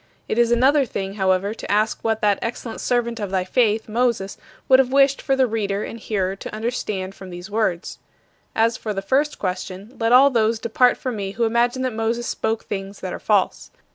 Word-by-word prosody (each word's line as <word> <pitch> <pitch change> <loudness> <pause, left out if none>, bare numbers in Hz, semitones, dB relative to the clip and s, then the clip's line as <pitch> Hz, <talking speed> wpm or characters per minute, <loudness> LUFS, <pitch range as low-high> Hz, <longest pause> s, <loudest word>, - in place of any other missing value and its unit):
It 225 - -1
is 235 0 +3
another 270 +4 +4
thing, 195 -5 -4
however, 190 0 +1
to - - -6
ask 215 +2 +1
what 220 -1 0
that 205 -2 +2
excellent 230 0 -5
servant 235 -1 0
of 205 -2 -3
thy 190 -1 0
faith, 220 +2 +1
Moses, 230 -3 0 0.3
would 260 0 +6
have 260 -1 +2
wished 275 0 +4
for 270 - +1
the 265 -1 +3
reader 210 -3 -2
and 230 - -7
hearer 195 -3 -2
to 210 - -7
understand 215 -4 -3
from 190 -1 -11
these 175 +3 -9
words. 205 -6 -1 0.6
As 225 +1 +2
for 215 -2 -4
the 195 - -3
first 285 +8 +1
question, 190 +4 -5
let 225 0 +1
all 270 +3 +7
those 225 -2 +2
depart 240 +3 +2
from 255 -4 -4
me 195 -1 -4
who 235 - -1
imagine 240 +3 +1
that 255 -2 -1
Moses 225 +2 -1
spoke 225 -1 -2
things 195 0 -6
that - - -4
are - - -5
false. - - 0
225 Hz, 205 wpm, -22 LUFS, 200-240 Hz, 0.6 s, all